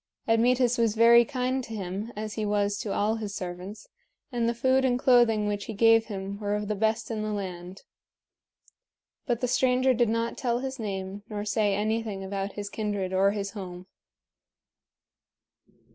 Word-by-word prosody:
Admetus 245 +2 +3
was 225 -2 +2
very 235 +1 +7
kind 255 +1 -2
to 225 - -7
him, 200 +3 -5
as 215 0 -5
he 220 - -3
was 205 -1 +1
to 210 - -4
all 215 +3 +1
his 210 -2 -5
servants, 180 - -7 0.4
and 235 -2 0
the - - 0
food 260 +2 +2
and 250 -2 +2
clothing 240 -4 +4
which 205 -1 -2
he 225 - -5
gave 225 +1 +5
him 200 -1 -5
were 205 -1 -1
of 210 0 -3
the 210 - 0
best 220 +3 -1
in 220 -1 -2
the 215 0 -2
land. 185 -2 -6 1.4
But 240 -2 0
the 250 - +1
stranger 255 +1 +3
did 240 -2 +2
not 230 +1 -1
tell 240 -2 0
his 265 +1 -5
name 195 -2 -4
nor 210 -1 -4
say 205 -1 +1
anything 215 -1 -2
about 195 +1 -4
his 205 -1 -5
kindred 205 -3 -3
or 195 +1 +4
his 200 -1 -3
home. 185 -3 -8
215 Hz, 175 wpm, -27 LUFS, 200-235 Hz, 1.4 s, very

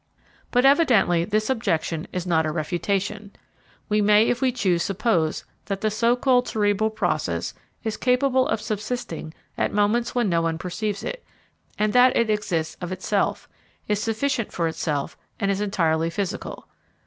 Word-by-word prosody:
But, 250 +1 +3
evidently, 235 - +4
this 215 +2 0
objection 170 -8 -1
is 180 -1 -3
not 160 -3 +2
a - - -1
refutation. 195 +6 -2 0.5
We 210 -1 +2
may 210 +1 +5
if 245 - 0
we 260 -1 +3
choose 185 -8 +1
suppose 185 -5 0 0.2
that 195 -1 -3
the 215 - +1
so 230 +3 +2
called 250 -1 +2
cerebral 210 0 +1
process 220 - -1 0.3
is 220 -1 -2
capable 255 +1 +2
of - - 0
subsisting 215 -6 -4 0.3
at - - +1
moments 210 +4 +1
when 240 -3 +2
no 170 -3 +2
one 165 -1 -1
perceives 200 +4 -3
it, - - -5 0.5
and 210 0 +1
that 250 +1 +5
it 230 -2 +2
exists 180 -7 -1
of 175 0 -4
itself, 190 +2 -1 0.4
is 210 -1 0
sufficient 230 +1 -1
for 170 -1 -1
itself, 150 -3 -2 0.2
and 200 -3 +1
is 195 +1 -1
entirely 165 -5 +1
physical. 200 +4 -4
210 Hz, 160 wpm, -24 LUFS, 175-230 Hz, 0.5 s, may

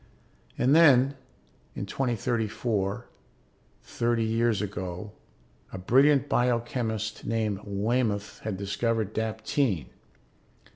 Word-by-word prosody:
And 135 +4 +3
then, 140 -5 +6 0.6
in - - -4
2034, 115 -2 -1 0.8
thirty 120 -1 0
years 115 -1 +1
ago, 95 0 -5 0.6
a - - -6
brilliant 135 +9 +4
biochemist 115 -3 -1
named 110 -3 -1
Waymoth 105 +1 -1
had 105 -3 -4
discovered 105 +2 -1
daptine. 110 - -1
110 Hz, 85 wpm, -27 LUFS, 100-120 Hz, 0.8 s, then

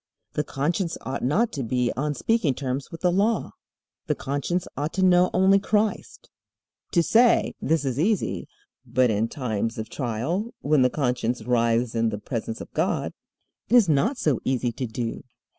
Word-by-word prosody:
The 150 - 0
conscience 165 +5 -1
ought 135 +1 -4
not 200 - +2
to 140 - -4
be 125 0 0
on 145 +2 -1
speaking 205 - +1
terms 135 0 -3
with 165 - -9
the 180 - +3
Law. 205 +5 +1 0.6
The - - +1
conscience 145 +6 -2
ought 145 +3 -3
to 190 0 +2
know 180 0 +5
only 190 +2 +4
Christ. 210 +1 -1 0.7
To 170 - +4
say 235 +6 +4
this 160 -3 +1
is 130 0 -1
easy, 205 +5 0 0.4
but 125 -1 +2
in 110 +2 +1
times 115 -3 -3
of 110 +1 -5
trial, 145 - -3
when 150 -1 +3
the 125 - +4
conscience 125 -4 -1
writhes 115 0 +1
in 115 0 +1
the 105 - -4
presence 115 +1 -4
of - - -10
God, - - -1 0.6
it 245 - +4
is 235 -6 +6
not 165 - +2
so 150 - +1
easy 125 -2 0
to 125 +2 -4
do. 115 +1 -4
140 Hz, 175 wpm, -25 LUFS, 120-180 Hz, 0.7 s, is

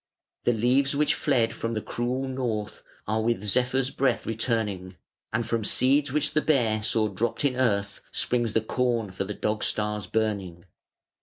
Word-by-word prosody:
The 120 - +4
leaves 130 +5 +2
which 150 +1 +3
fled 125 -6 +1
from 115 0 -3
the - - 0
cruel 125 +4 -2
North 120 -5 -3 0.3
Are 110 +1 +1
with 115 -2 0
Zephyr's 125 +4 +1
breath 135 0 0
returning, 105 -5 -2 0.4
And 115 - 0
from 115 0 -1
seeds 140 +6 +3
which 150 +1 0
the 155 - +3
Bear 115 -9 +2
saw 110 0 +1
dropped 110 +8 -2
in 130 -3 +2
earth 100 -6 0
Springs 120 -3 0
the 110 - +3
corn 115 -2 0
for 95 +1 -3
the 105 +1 -5
Dog 105 0 -1
star's 105 -1 -1
burning. 100 -6 -2
115 Hz, 165 wpm, -26 LUFS, 105-130 Hz, 0.4 s, The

